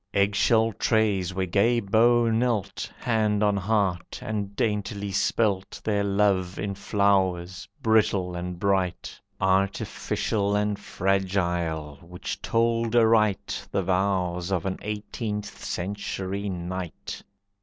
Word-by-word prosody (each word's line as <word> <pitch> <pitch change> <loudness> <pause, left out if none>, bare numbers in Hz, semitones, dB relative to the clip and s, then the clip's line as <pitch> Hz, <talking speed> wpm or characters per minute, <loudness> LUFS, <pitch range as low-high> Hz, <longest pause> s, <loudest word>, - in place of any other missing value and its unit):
Eggshell 105 +3 +3
trays 105 -5 +2
where 95 0 -1
gay 105 +6 +3
beaux 115 +3 +4
knelt, 110 -4 -1
Hand 110 -4 +1
on 105 -1 +3
heart, 100 -3 0
and 100 -2 -3
daintily 100 -2 -1
spelt 100 0 0
Their 105 -2 +1
love 100 -2 +1
in 100 -1 -2
flowers, 95 -2 0 0.2
brittle 100 -5 +2
and 90 0 -4
bright, 95 -2 -1 0.2
Artificial 100 +2 0
and 105 0 0
fragile, 90 -6 -1
which 90 +1 -6
told 115 0 +1
aright 110 -3 +3
The 95 - 0
vows 90 -1 0
of 95 -2 0
an 95 -1 -2
eighteenth 105 0 -5
century 100 +1 -3
knight. 90 -1 -5
100 Hz, 110 wpm, -26 LUFS, 95-105 Hz, 0.2 s, beaux